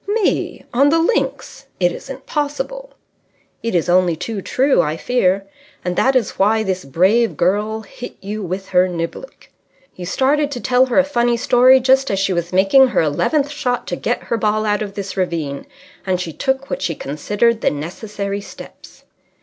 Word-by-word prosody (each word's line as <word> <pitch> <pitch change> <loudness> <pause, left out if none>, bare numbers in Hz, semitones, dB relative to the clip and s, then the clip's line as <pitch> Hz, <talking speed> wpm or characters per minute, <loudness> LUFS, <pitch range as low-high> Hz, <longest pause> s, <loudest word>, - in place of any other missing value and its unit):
"Me! 420 0 -1
On 275 +4 +4
the 325 - +3
links! 335 +8 -1
It - - +3
isn't - - -9
possible." - - -4 0.7
"It 230 -4 -2
is 170 - +1
only 180 -1 +3
too 195 +5 -5
true, 265 +7 +2
I 155 +1 -2
fear. 195 -3 +1 0.4
And 180 0 -1
that 265 +7 +2
is 240 -6 0
why 220 +3 +3
this 190 -5 -3
brave 190 - +2
girl 210 +5 0
hit 230 +3 -10
you 210 +2 -5
with 190 +1 -5
her 180 0 +4
niblick. 175 - -6 0.4
You 180 -1 -7
started 280 - +1
to 245 - -5
tell 255 +1 +3
her 245 - -1
a 280 - +7
funny 240 -4 +1
story 250 +2 +5
just 265 +1 +3
as 195 - 0
she 195 0 +1
was 170 0 -2
making 195 +9 +5
her 245 - +1
eleventh 280 - 0
shot 245 -4 -2
to - - -1
get - - -2
her 230 - -2
ball 215 0 0
out 210 0 0
of 200 -2 -5
this 200 -1 -5
ravine, 165 -7 -3 0.4
and 185 -2 -1
she 170 -3 -5
took 265 - -2
what - - -3
she 165 - -1
considered 205 +12 0
the - - +3
necessary 200 +6 -5
steps." - - -13
210 Hz, 180 wpm, -19 LUFS, 185-260 Hz, 0.7 s, a